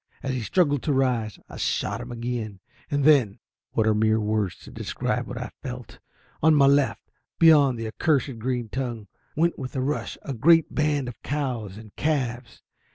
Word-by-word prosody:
As 135 Hz, -1 st, -2 dB
he 130 Hz, -, -2 dB
struggled 145 Hz, -, +2 dB
to 150 Hz, -, 0 dB
rise, 125 Hz, -5 st, 0 dB
I -, -, -10 dB
shot 100 Hz, +4 st, -1 dB
him 120 Hz, 0 st, -8 dB
again. 115 Hz, -4 st, -4 dB, 0.3 s
And 145 Hz, -1 st, 0 dB
then 135 Hz, -10 st, +5 dB, 0.4 s
what 110 Hz, -, +2 dB
are 110 Hz, -, +4 dB
mere 110 Hz, +1 st, +2 dB
words 105 Hz, -3 st, -1 dB
to -, -, -12 dB
describe -, -, -3 dB
what -, -, -6 dB
I -, -, -5 dB
felt! -, -, -8 dB, 0.4 s
On 155 Hz, +1 st, +5 dB
my 140 Hz, -2 st, +6 dB
left, 140 Hz, 0 st, +3 dB, 0.3 s
beyond 145 Hz, -6 st, +6 dB
the 115 Hz, -, -4 dB
accursed 135 Hz, +1 st, 0 dB
green 125 Hz, 0 st, -2 dB
tongue, 120 Hz, -3 st, -4 dB, 0.3 s
went 170 Hz, +2 st, +1 dB
with 130 Hz, 0 st, -6 dB
a 130 Hz, -, 0 dB
rush 145 Hz, +3 st, -2 dB
a 140 Hz, -, -4 dB
great 165 Hz, +7 st, +4 dB
band 150 Hz, -3 st, 0 dB
of 120 Hz, -, -9 dB
cows 125 Hz, -9 st, -3 dB
and 110 Hz, -1 st, -13 dB
calves. 125 Hz, -6 st, -2 dB
125 Hz, 180 wpm, -25 LUFS, 110-145 Hz, 0.4 s, my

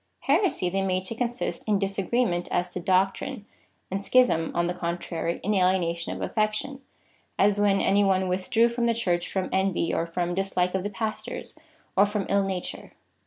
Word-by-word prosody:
^ -, -, -46 dB, 0.2 s
Heresy 310 Hz, -, +2 dB
they 195 Hz, +2 st, 0 dB
made 185 Hz, -1 st, 0 dB
to 210 Hz, -, -4 dB
consist 240 Hz, +1 st, -3 dB
in 210 Hz, -2 st, +3 dB
disagreement 195 Hz, -1 st, 0 dB
as 175 Hz, 0 st, -1 dB
to 180 Hz, -, -3 dB
doctrine, 190 Hz, +3 st, 0 dB, 0.5 s
and 195 Hz, +1 st, -2 dB
schism, 225 Hz, -10 st, +3 dB
on 170 Hz, 0 st, +2 dB
the 175 Hz, -, -1 dB
contrary, 170 Hz, -1 st, -3 dB
in 210 Hz, -, +1 dB
alienation 180 Hz, -3 st, +1 dB
of -, -, -4 dB
affection, 215 Hz, +5 st, -1 dB, 0.6 s
as 205 Hz, +1 st, +3 dB
when 200 Hz, -1 st, +3 dB
any 205 Hz, +1 st, +3 dB
one 190 Hz, -1 st, +2 dB
withdrew 220 Hz, +6 st, +2 dB
from 235 Hz, 0 st, 0 dB
the 230 Hz, -, +2 dB
Church 175 Hz, -6 st, -1 dB
from 190 Hz, -1 st, -1 dB
envy, 190 Hz, -3 st, +1 dB
or 165 Hz, -, 0 dB
from 175 Hz, +1 st, -2 dB
dislike 180 Hz, -1 st, 0 dB
of 190 Hz, -, 0 dB
the 205 Hz, -, -3 dB
pastors, 215 Hz, +3 st, -5 dB, 0.4 s
or 200 Hz, +2 st, +5 dB
from 205 Hz, -1 st, -2 dB
ill 200 Hz, 0 st, +3 dB
nature. 190 Hz, -2 st, -5 dB
195 Hz, 180 wpm, -26 LUFS, 180-215 Hz, 0.6 s, or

